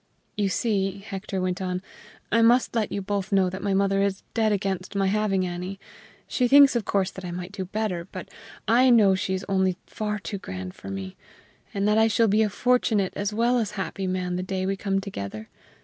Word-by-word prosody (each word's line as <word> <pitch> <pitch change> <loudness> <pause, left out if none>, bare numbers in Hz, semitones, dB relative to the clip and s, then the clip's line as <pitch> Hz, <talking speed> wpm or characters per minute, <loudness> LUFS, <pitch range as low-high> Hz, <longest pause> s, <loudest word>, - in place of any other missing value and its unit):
"You 205 -2 +1
see," 195 -2 0
Hector 195 -1 -4
went 185 +1 -1
on, 185 0 -2 0.5
"I 230 - +4
must 240 +2 +4
let 225 -3 0
you 200 - -3
both 200 0 -2
know 190 -2 +3
that 190 +1 -6
my 200 -1 0
mother 195 0 +2
is 200 -1 -1
dead 220 -2 +2
against 195 -1 -2
my 195 0 +2
having 195 -1 +1
Annie. 180 +2 -5 0.5
She 250 - +1
thinks, 280 +1 +7
of 235 - 0
course, 190 -2 0
that 190 - -10
I 180 - -5
might 180 +1 -6
do 190 -2 -5
better; 185 -3 -3
but - - -7 0.4
I 250 +3 +5
know 215 -5 +6
she 190 0 -1
is 190 - -5
only 190 -2 +1
far 210 -1 -3
too 200 -1 -5
good 95 - -6
for 95 - -10
me, 95 -1 -6 0.5
and 200 -2 0
that 210 +1 +4
I 220 - +5
shall 225 +1 +3
be 210 +2 +3
a 215 - +2
fortunate 220 -3 +1
as 205 +1 -1
well 235 +3 +2
as 210 -2 -2
happy 195 -1 -3
man 180 -1 -1
the - - -2
day 185 0 -2
we 195 +1 0
come 195 0 -1
together. 110 - -6
195 Hz, 215 wpm, -25 LUFS, 185-215 Hz, 0.5 s, thinks